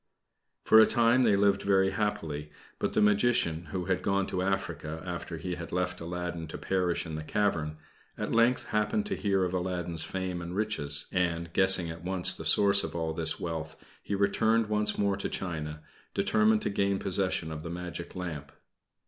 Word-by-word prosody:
For 110 - +7
a 110 - +7
time 120 +2 +3
they 110 -5 +4
lived 100 0 +3
very 95 -1 +3
happily, 80 -8 -3 0.3
but - - -1
the - - +3
Magician, 105 -6 +2
who 90 -2 -4
had 95 -1 0
gone 100 -1 +1
to 90 - -3
Africa 85 -5 -2
after 85 -1 -5
he 90 +4 -4
had 85 -3 -7
left 90 0 -2
Aladdin 85 -1 -4
to 80 - -7
perish 90 -3 -1
in 80 - -6
the 80 0 -4
cavern, 80 -4 -1 0.4
at - - -3
length 115 +2 +2
happened 110 - +1
to 205 - -2
hear 100 -2 +1
of 90 0 -2
Aladdin's 90 -3 -1
fame 95 -2 -4
and 85 +1 -6
riches; 75 -9 0
and 85 -2 -1
guessing 95 -3 +4
at 85 +1 -10
once 90 0 +3
the - - -8
source 100 -1 +5
of - - -5
all 80 -1 -2
this 80 -1 -1
wealth, 80 -2 -4 0.3
he 100 - -3
returned 110 +3 +2
once 105 0 +1
more 100 -1 +1
to 100 - -3
China, 75 -4 -4 0.3
determined 110 0 +3
to - - -1
gain 100 0 +1
possession 90 -4 -1
of 80 0 -6
the 85 - -7
magic 85 0 -6
lamp. 80 -6 -6
90 Hz, 185 wpm, -29 LUFS, 85-100 Hz, 0.4 s, For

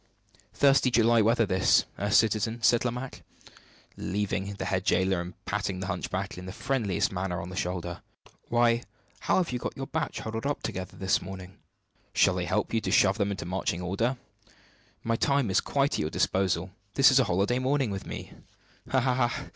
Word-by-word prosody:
"Thirsty 135 -2 +4
July 115 -1 +4
weather, 115 +1 +3
this 95 -2 +3
eh, 100 - -1
citizen?" 110 +2 +2
said 120 +1 +4
Lomaque, 125 +1 -4 0.7
leaving 100 0 -2
the - - -4
head 95 -1 -1
jailer, 95 -2 +2
and 90 +1 -8
patting 100 -2 -2
the 95 - -4
hunchback 95 0 -3
in 90 - -9
the - - -5
friendliest 105 -4 -1
manner 90 -2 -2
on 85 - -6
the 95 - -8
shoulder. 90 -3 -3 0.5
"Why, 120 0 +3 0.4
how - - +1
you 185 - +4
have 125 - -3
got - - -5
your 135 - -4
batch 160 +3 -3
huddled 110 +4 -4
up 145 - -2
together 95 -1 -5
this 95 0 +1
morning! 95 0 -9 0.6
Shall - - +4
I - - -1
help - - -1
you 115 - +2
to - - -3
shove 100 +2 +4
them 100 -1 +1
into 100 -4 -4
marching 90 -1 -2
order? 115 +8 -1 0.9
My 115 0 0
time 140 -6 +1
is - - +3
quite 140 0 0
at - - -1
your 75 - -1
disposal. 95 +1 0 0.2
This 135 +1 +7
is 135 - +5
a 130 - +4
holiday 100 +8 +1
morning 130 -2 +1
with 100 -1 -5
me!" - - -7 0.6
"Ha, 130 - +3
ha, 125 -1 +2
ha! - - -6
105 Hz, 190 wpm, -28 LUFS, 95-120 Hz, 0.9 s, This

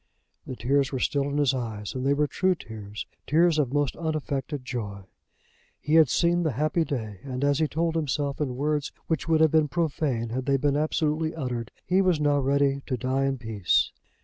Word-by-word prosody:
The 130 - -5
tears 135 +3 +1
were 135 - -2
still 140 +2 0
in 145 - -2
his 140 -2 +3
eyes, 110 -5 -4
and 130 - -4
they 140 +1 +3
were 150 +1 +2
true 185 +5 +1
tears, 105 -7 -8 0.2
tears 165 +1 +4
of 135 -4 +1
most 145 -2 0
unaffected 150 -4 -3
joy. 105 -6 -5 0.8
He 150 - -2
had 160 -4 +7
seen 175 +4 +2
the 155 -5 0
happy 155 +6 +1
day; 110 - -4
and 130 -1 -4
as 145 0 +2
he 155 - +2
told 165 +2 -1
himself 145 -2 -1
in 130 -4 -1
words 150 +2 -1
which 160 -2 -2
would 160 -1 +3
have 160 -2 +5
been 155 -1 +4
profane 140 -7 -1
had 130 +3 -3
they 140 0 +3
been 145 +1 +1
absolutely 155 +1 0
uttered, 125 -6 -3 0.2
he 185 +2 +3
was 180 -5 +2
now 145 -1 +2
ready 140 0 +2
to 130 - -1
die 130 +3 0
in 135 -1 0
peace. 110 -6 +1
140 Hz, 200 wpm, -26 LUFS, 130-155 Hz, 0.8 s, had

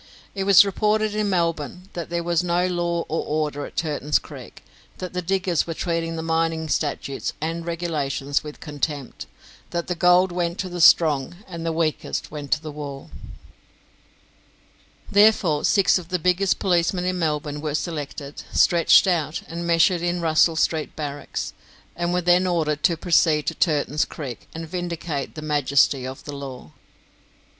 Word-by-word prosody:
It 195 -1 -3
was 200 0 +8
reported 210 +2 +1
in 210 -1 0
Melbourne 170 0 -1
that 170 -2 -5
there 170 0 -2
was 170 0 +1
no 175 0 +1
law 175 -1 -1
or 160 - -2
order 150 -1 -2
at - - -16
Turton's 150 -2 0
Creek; - - -11 0.3
that 185 -1 -6
the 180 - -2
diggers 185 -1 0
were 165 - -4
treating 165 -1 -2
the 160 - -4
mining 165 -1 0
statutes 145 -2 -2
and 165 +2 -3
regulations 150 -5 -2
with 150 -1 -9
contempt; 145 -2 -4 0.4
that 170 -1 -2
the 180 - -2
gold 180 +2 +4
went 175 0 -2
to 185 - -3
the 175 -1 -4
strong, 155 -2 +5
and 170 -3 -7
the 165 - -1
weakest 160 -1 -2
went 145 -2 -7
to 155 - +1
the 155 -1 -7
wall. 145 -2 -8 2.0
Therefore, 200 -7 +4
six 200 -2 +4
of 170 - -11
the 180 - 0
biggest 180 +3 +1
policemen 180 -1 +1
in 185 0 -1
Melbourne 150 -2 -2
were 150 -1 -2
selected, 145 -3 -5
stretched 170 -1 +5
out, 165 -5 0
and 170 +1 -5
measured 170 +1 +3
in 175 0 -1
Russell 165 0 +3
Street 160 0 0
barracks, 145 -2 -5 0.4
and 175 0 -1
were 180 0 +1
then 180 +1 +3
ordered 155 -4 0
to 170 -3 +3
proceed 160 -3 +3
to - - -1
Turton's 150 -2 +1
Creek 130 -6 -8
and 165 0 -6
vindicate 170 -4 -4
the 155 - -7
majesty 140 -3 +2
of 130 0 -8
the 145 - -7
law. 130 - -8
165 Hz, 165 wpm, -23 LUFS, 150-175 Hz, 2.0 s, was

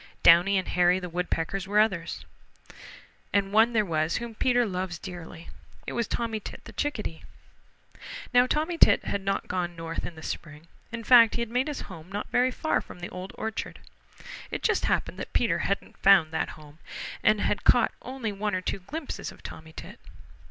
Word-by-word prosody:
Downy 175 +4 +7
and 185 - -1
Hairy 180 +1 +3
the 180 -1 -6
Woodpeckers 180 +2 -2
were 205 +1 +3
others. 190 -6 0 1.1
And 200 0 +1
one 225 +2 +5
there 215 -2 +3
was 160 -2 0
whom 235 -1 -5
Peter 245 +2 +2
loves 185 -3 -3
dearly. 175 -2 -9 0.4
It - - -5
was 235 -1 -1
Tommy 230 -2 -2
Tit - - -9
the - - -10
Chickadee. 215 - -3 1.1
Now 245 0 +6
Tommy 315 +5 -1
Tit - - +6
had 200 - -2
not 195 0 -1
gone 175 -1 -2
north 165 0 -5
in 175 - -6
the 160 - -11
spring. 155 +1 -6 0.2
In 235 -1 -5
fact, 230 -1 +7
he 235 - -1
had 230 - -8
made 250 +3 +1
his 295 - -4
home 180 -1 -10
not 205 +1 -5
very 250 +1 +3
far 315 +5 0
from - - -12
the 175 - -6
Old 185 +2 -7
Orchard. 220 -1 -4 0.7
It - - -5
just - - +2
happened - - -1
that - - -7
Peter - - +2
hadn't - - -2
found 190 -5 +6
that 160 - -1
home, 150 0 -15 0.4
and - - +4
had - - 0
caught - - +5
only 255 -4 -4
one 205 0 -2
or 185 - -1
two 190 - -3
glimpses 285 - -6
of - - -17
Tommy 160 0 -9
Tit. - - -10
195 Hz, 190 wpm, -27 LUFS, 175-230 Hz, 1.1 s, Downy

